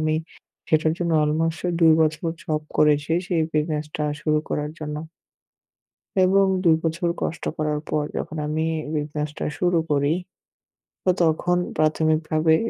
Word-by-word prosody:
আমি 155 0 +1 0.5
সেটার 155 0 +3
জন্য 170 -1 0
অলমোস্ট 160 +2 0 0.2
২ 160 -1 +7
বছর 155 0 +1 0.2
জব 155 -1 -1
করেছি, 150 0 +3 0.2
সেই 175 -4 +1
বিজনেসটা 150 0 -1 0.2
শুরু 155 -1 +2
করার 150 0 -2
জন্য 150 -1 -4 1.3
এবং 195 +1 +4 0.2
২ 165 -3 +6
বছর 170 +2 0
কষ্ট 165 - -3
করার 150 -1 0
পর 150 - +1
যখন 160 - -4
আমি 155 +1 -1 0.3
বিজনেসটা 150 0 -3
শুরু 175 -2 +3
করি। 145 +1 +2 0.9
তো 185 - +1
তখন 170 +2 +2 0.2
প্রাথমিকভাবে 155 0 +2
155 Hz, 130 wpm, -23 LUFS, 150-165 Hz, 1.3 s, ২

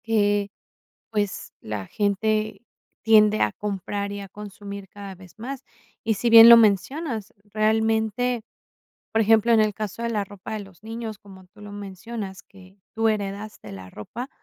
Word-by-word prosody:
Eh, 205 -2 +2 0.6
pues, 205 -3 -2
la 105 -3 -5
gente 215 +1 0 0.4
tiende 215 -1 +5
a 105 - +3
comprar 200 - -4
y 205 - -5
a 195 - -9
consumir 200 0 -9
cada 200 -1 -9
vez 185 -1 -16
más. 255 +4 -6 0.4
Y 225 -1 +1
si 235 +4 0
bien 230 0 +11
lo 235 - +12
mencionas, 225 - +1
realmente, 220 +2 0 0.7
por 225 - +3
ejemplo, 225 +2 +4
en 225 - +6
el 215 -1 +2
caso 215 +2 -5
de 235 - -1
la 210 -3 -1
ropa 200 0 -10
de 215 - -3
los 195 -2 -14
niños, 225 -1 -6
como 190 -3 -15
tú 210 +3 -20
lo 205 0 -9
mencionas, 200 0 -7
que 190 0 -18 0.2
tú 225 0 +2
heredaste 205 - -4
la 95 -1 -9
ropa. 235 - -7
210 Hz, 160 wpm, -24 LUFS, 195-220 Hz, 0.7 s, lo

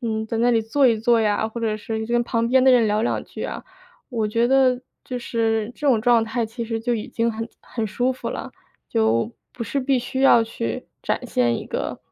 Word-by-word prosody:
嗯， 220 -2 -2
在 225 +1 -3
那 240 +1 +3
里 225 -2 +2
坐 265 +5 +3
一 230 - +3
坐 230 +1 +3
呀， 215 0 +1
或 230 +1 -6
者 220 -2 0
是 220 +1 -4
你 220 - -3
跟 240 +1 +2
旁 230 -1 0
边 260 +1 +4
的 265 - +7
人 235 -3 +5
聊 210 +1 +1
两 235 - 0
句 - - -8
啊， - - -5 0.5
我 230 -5 -1
觉 230 +3 +2
得 260 -2 +4 0.2
就 250 - -4
是 225 -2 -1
这 295 - -4
种 245 -5 +4
状 235 0 +4
态 230 +1 -1
其 230 +2 -6
实 225 0 -2
就 240 +1 0
已 215 - -4
经 230 0 0
很 225 +1 -5
很 225 -2 -4
舒 245 +5 0
服 255 - -6
了， - - -5 0.4
就 115 - +1 0.2
不 240 - -6
是 275 - -2
必 265 0 +2
须 260 +2 -4
要 235 -4 +7
去 115 - -4 0.2
展 - - -2
现 120 -1 +1
一 - - -8
个， - - -3
230 Hz, 255 characters per minute, -23 LUFS, 220-245 Hz, 0.5 s, 的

